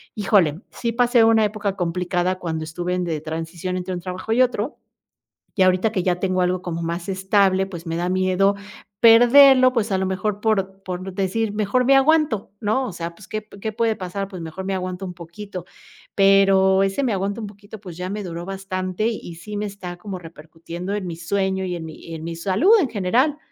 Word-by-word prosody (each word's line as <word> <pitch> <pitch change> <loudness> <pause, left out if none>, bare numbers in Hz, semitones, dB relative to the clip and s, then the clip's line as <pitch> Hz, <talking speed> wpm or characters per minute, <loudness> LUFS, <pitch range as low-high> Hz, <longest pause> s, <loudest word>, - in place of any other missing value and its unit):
híjole, 195 -6 +2
sí 235 -1 -3
pasé 240 0 +4
una 225 -1 +5
época 205 -1 -2
complicada 180 +1 -1
cuando 160 -3 -3
estuve 175 +3 -3
en 180 - -1
de 160 -3 -3
transición 165 +3 -4
entre 185 +1 -4
un 175 - -4
trabajo 185 +4 -5
y 245 - +3
otro. 250 +1 0 0.8
Y 190 - +4
ahorita 185 +4 +3
que 190 - -1
ya 180 -1 0
tengo 185 -1 0
algo 180 0 0
como 170 -2 -4
más 170 +3 -4
estable, 190 0 +2
pues 170 -3 -9
me 165 - -2
da 175 +1 -1
miedo 185 +2 +2 0.5
perderlo, 255 +3 +7
pues 225 -3 0
a 190 - +2
lo 190 - 0
mejor 195 +2 -2
por 195 -3 0
por 185 0 -5
decir, 200 +3 -1
mejor 215 +4 +1
me 275 +2 +5
aguanto, 280 -7 +2
¿no? 220 +5 +1
O 205 - -6
sea, 170 0 -5
pues, 205 - -15
¿qué 215 0 -5
qué 220 - -2
puede 225 0 +1
pasar?, 195 +2 -4
pues, 185 -4 -8
mejor 165 +4 -7
me 195 - -1
aguanto 185 0 -4
un 180 - -6
poquito, 180 +2 -9 0.5
pero 195 -1 +5
ese 195 +8 0
me 245 -5 +1
aguanta 200 +3 -2
un 215 - -5
poquito, 205 +1 -12
pues, 180 -5 -9
ya 180 +1 -4
me 205 +1 -4
duró 170 -1 -6
bastante 190 +1 -3
y 210 -7 -5
sí 205 +5 -7
me 210 - -2
está 185 -3 -8
como 190 +1 -6
repercutiendo 165 +3 -8
en 205 -2 -3
mi 170 - -5
sueño, 190 +2 -1
y 180 -1 -3
en 165 -2 -6
mi 160 +1 -9
en 160 - -8
mi 165 0 -5
salud 195 - +2
en 280 - 0
general. 235 +9 +1
190 Hz, 210 wpm, -22 LUFS, 180-210 Hz, 0.8 s, perderlo